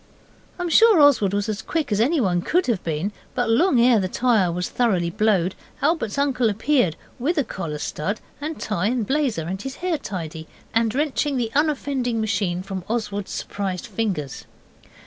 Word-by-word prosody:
I 355 Hz, -, -3 dB
am 350 Hz, -, -2 dB
sure 445 Hz, +1 st, +6 dB
Oswald 280 Hz, -10 st, +5 dB
was 205 Hz, +1 st, -1 dB
as 215 Hz, -1 st, -3 dB
quick 315 Hz, -6 st, -2 dB
as 205 Hz, -, +1 dB
anyone 230 Hz, -, +2 dB
could 355 Hz, -, +1 dB
have 230 Hz, -7 st, -1 dB
been, 165 Hz, +5 st, -2 dB, 0.2 s
but 245 Hz, -2 st, +1 dB
long 270 Hz, +2 st, +4 dB
ere 235 Hz, -1 st, +5 dB
the 185 Hz, -, 0 dB
tyre 215 Hz, -4 st, +2 dB
was 180 Hz, +1 st, -2 dB
thoroughly 185 Hz, -9 st, +1 dB
blowed 190 Hz, -2 st, +2 dB, 0.3 s
Albert's 295 Hz, -7 st, 0 dB
uncle 260 Hz, -5 st, +2 dB
appeared, 215 Hz, -, +1 dB, 0.2 s
with 315 Hz, +8 st, 0 dB
a 290 Hz, -, +3 dB
collar 165 Hz, -9 st, -5 dB
stud 165 Hz, +7 st, -3 dB, 0.2 s
and 310 Hz, +1 st, -4 dB
tie 205 Hz, -2 st, -1 dB
and 240 Hz, -1 st, 0 dB
blazer, 265 Hz, -, 0 dB
and 190 Hz, +4 st, -4 dB
his 270 Hz, +3 st, -6 dB
hair 350 Hz, -4 st, -1 dB
tidy, 160 Hz, -, -6 dB, 0.3 s
and 225 Hz, 0 st, +1 dB
wrenching 290 Hz, -1 st, 0 dB
the 230 Hz, -3 st, -1 dB
unoffending 275 Hz, -5 st, 0 dB
machine 200 Hz, -4 st, -1 dB
from 190 Hz, -1 st, -5 dB
Oswald's 210 Hz, -4 st, -2 dB
surprised 195 Hz, 0 st, -4 dB
fingers. 195 Hz, -, -3 dB
225 Hz, 175 wpm, -23 LUFS, 190-275 Hz, 0.3 s, sure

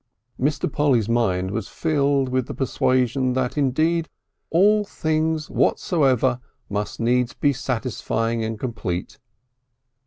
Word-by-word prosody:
Mr. 145 Hz, +4 st, 0 dB
Polly's 130 Hz, -8 st, +2 dB
mind 95 Hz, -6 st, +1 dB
was 105 Hz, -1 st, -3 dB
filled 140 Hz, -4 st, +1 dB
with 130 Hz, -1 st, 0 dB
the -, -, -6 dB
persuasion 130 Hz, -1 st, +1 dB
that 125 Hz, -1 st, -1 dB
indeed 155 Hz, +4 st, +1 dB, 0.4 s
all 210 Hz, +5 st, +4 dB
things 160 Hz, -4 st, -1 dB
whatsoever 130 Hz, -, +2 dB, 0.3 s
must 105 Hz, +1 st, -3 dB
needs 120 Hz, +1 st, +1 dB
be 145 Hz, -1 st, +2 dB
satisfying 115 Hz, -2 st, -2 dB
and 110 Hz, -1 st, -4 dB
complete. 100 Hz, -8 st, -4 dB
130 Hz, 115 wpm, -23 LUFS, 115-150 Hz, 0.4 s, all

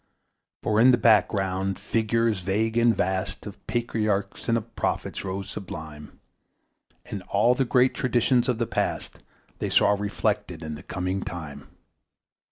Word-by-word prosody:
For 110 Hz, 0 st, +2 dB
in 125 Hz, -, +7 dB
the 125 Hz, -, +6 dB
background 95 Hz, -4 st, +2 dB
figures 110 Hz, 0 st, 0 dB
vague 105 Hz, +5 st, 0 dB
and 120 Hz, -1 st, +4 dB
vast 95 Hz, +1 st, -2 dB
Of -, -, -10 dB
patriarchs 105 Hz, -5 st, -1 dB
and 115 Hz, -, +3 dB
of 115 Hz, 0 st, -7 dB
prophets -, -, -2 dB
rose 95 Hz, 0 st, -4 dB
sublime, 80 Hz, -6 st, -8 dB, 0.9 s
And -, -, -6 dB
all 120 Hz, -, +3 dB
the 130 Hz, +1 st, 0 dB
great 125 Hz, +1 st, +3 dB
traditions 125 Hz, 0 st, +2 dB
of 125 Hz, -, +1 dB
the 115 Hz, -, 0 dB
Past -, -, -3 dB, 0.4 s
They -, -, -2 dB
saw -, -, +4 dB
reflected 100 Hz, -4 st, -1 dB
in 80 Hz, 0 st, -5 dB
the 75 Hz, -, -8 dB
coming 95 Hz, +2 st, -3 dB
time. 80 Hz, -6 st, -7 dB
105 Hz, 145 wpm, -26 LUFS, 95-115 Hz, 0.9 s, in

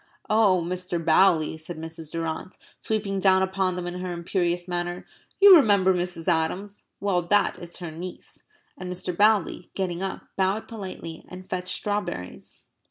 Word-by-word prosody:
"Oh, 200 Hz, -5 st, +4 dB
Mr. 180 Hz, 0 st, -3 dB
Bowley," 160 Hz, -1 st, +3 dB
said 160 Hz, +1 st, -7 dB
Mrs. 160 Hz, -1 st, -8 dB
Durrant, 165 Hz, +2 st, -4 dB, 0.2 s
sweeping 205 Hz, -3 st, -2 dB
down 190 Hz, -1 st, +4 dB
upon 190 Hz, -1 st, 0 dB
them 180 Hz, -1 st, -4 dB
in 175 Hz, 0 st, -5 dB
her 180 Hz, 0 st, -4 dB
imperious 175 Hz, 0 st, -1 dB
manner, 175 Hz, 0 st, -3 dB, 0.3 s
"you 400 Hz, -1 st, +10 dB
remember 200 Hz, -, +5 dB
Mrs. 175 Hz, -2 st, -3 dB
Adams? 180 Hz, +4 st, -1 dB
Well, 195 Hz, -3 st, +1 dB
that 205 Hz, +2 st, +2 dB
is 175 Hz, 0 st, -9 dB
her 170 Hz, -2 st, -6 dB
niece." 175 Hz, +3 st, -9 dB, 0.3 s
And 180 Hz, 0 st, -6 dB
Mr. 180 Hz, 0 st, -4 dB
Bowley, 205 Hz, -3 st, +2 dB
getting 180 Hz, -2 st, -2 dB
up, 195 Hz, 0 st, -4 dB
bowed 195 Hz, +3 st, 0 dB
politely 185 Hz, -6 st, -7 dB
and 185 Hz, 0 st, -10 dB
fetched 185 Hz, 0 st, -2 dB
strawberries. 180 Hz, -, -4 dB
180 Hz, 155 wpm, -25 LUFS, 170-195 Hz, 0.3 s, you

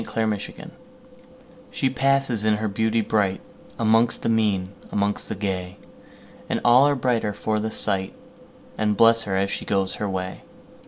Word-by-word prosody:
1840 110 Hz, -3 st, -3 dB
The -, -, -12 dB
Secret -, -, -12 dB, 1.0 s
SHE 135 Hz, -, 0 dB
passes 135 Hz, -4 st, +1 dB
in 110 Hz, 0 st, +3 dB
her 110 Hz, +1 st, -2 dB
beauty 110 Hz, +2 st, 0 dB
brightAmongst 110 Hz, +3 st, 0 dB
the -, -, -1 dB
mean, 105 Hz, -4 st, +1 dB, 0.2 s
amongst 100 Hz, 0 st, -1 dB
the -, -, -3 dB
gay, 95 Hz, -2 st, -4 dB, 0.7 s
And -, -, 0 dB
all 125 Hz, +4 st, +6 dB
are 145 Hz, -, +2 dB
brighter 120 Hz, -5 st, 0 dB
for 110 Hz, +1 st, -2 dB
the 110 Hz, +1 st, -2 dB
sight, 95 Hz, -3 st, 0 dB, 0.6 s
And 105 Hz, -1 st, +1 dB
bless 115 Hz, 0 st, +6 dB
her 95 Hz, -, 0 dB
as 100 Hz, +1 st, 0 dB
she -, -, -4 dB
goes 95 Hz, -1 st, 0 dB
her 105 Hz, -, -1 dB
way. 95 Hz, -1 st, -4 dB
110 Hz, 160 wpm, -23 LUFS, 100-115 Hz, 1.0 s, all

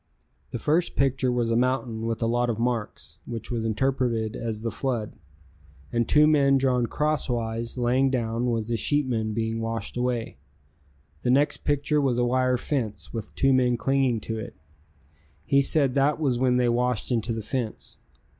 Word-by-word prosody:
The -, -, -4 dB
first 160 Hz, +8 st, +1 dB
picture 135 Hz, -2 st, +1 dB
was 120 Hz, -2 st, 0 dB
a -, -, +2 dB
mountain 120 Hz, -2 st, 0 dB
with 115 Hz, 0 st, -2 dB
a -, -, +2 dB
lot 120 Hz, +1 st, +1 dB
of 115 Hz, -, -1 dB
marks, 115 Hz, -8 st, -3 dB
which 115 Hz, -1 st, -6 dB
was 115 Hz, -2 st, -1 dB
interpreted 115 Hz, -1 st, 0 dB
as 110 Hz, -2 st, -4 dB
the 115 Hz, -, -1 dB
flood, 120 Hz, -6 st, -3 dB, 0.8 s
and 120 Hz, -1 st, 0 dB
two 150 Hz, 0 st, +6 dB
men 140 Hz, -3 st, +4 dB
drawn 125 Hz, -3 st, +1 dB
crosswise 120 Hz, -7 st, -1 dB
laying 125 Hz, +2 st, +2 dB
down 120 Hz, -1 st, -1 dB
was 115 Hz, -1 st, -2 dB
the 115 Hz, -, 0 dB
sheepmen 115 Hz, -4 st, 0 dB
being 115 Hz, 0 st, -1 dB
washed 115 Hz, -2 st, -3 dB
away. 125 Hz, -, -2 dB, 0.8 s
The 125 Hz, -, -1 dB
next 140 Hz, +4 st, +3 dB
picture 145 Hz, +1 st, 0 dB
was 130 Hz, -4 st, +1 dB
a 120 Hz, -, +2 dB
wire 130 Hz, +1 st, +2 dB
fence 115 Hz, -7 st, -3 dB
with 115 Hz, -3 st, -6 dB
two 135 Hz, 0 st, +3 dB
men 125 Hz, -2 st, +3 dB
clinging 130 Hz, -1 st, +1 dB
to 110 Hz, +1 st, -4 dB
it. 110 Hz, -, -8 dB, 0.9 s
He 140 Hz, 0 st, +4 dB
said 140 Hz, -2 st, +2 dB
that 140 Hz, +3 st, +2 dB
was 130 Hz, -6 st, +1 dB
when 125 Hz, -1 st, +3 dB
they 125 Hz, -1 st, +2 dB
washed 125 Hz, 0 st, 0 dB
into 115 Hz, -1 st, 0 dB
the 110 Hz, -1 st, -3 dB
fence. 120 Hz, -1 st, -5 dB
120 Hz, 175 wpm, -26 LUFS, 115-135 Hz, 0.9 s, two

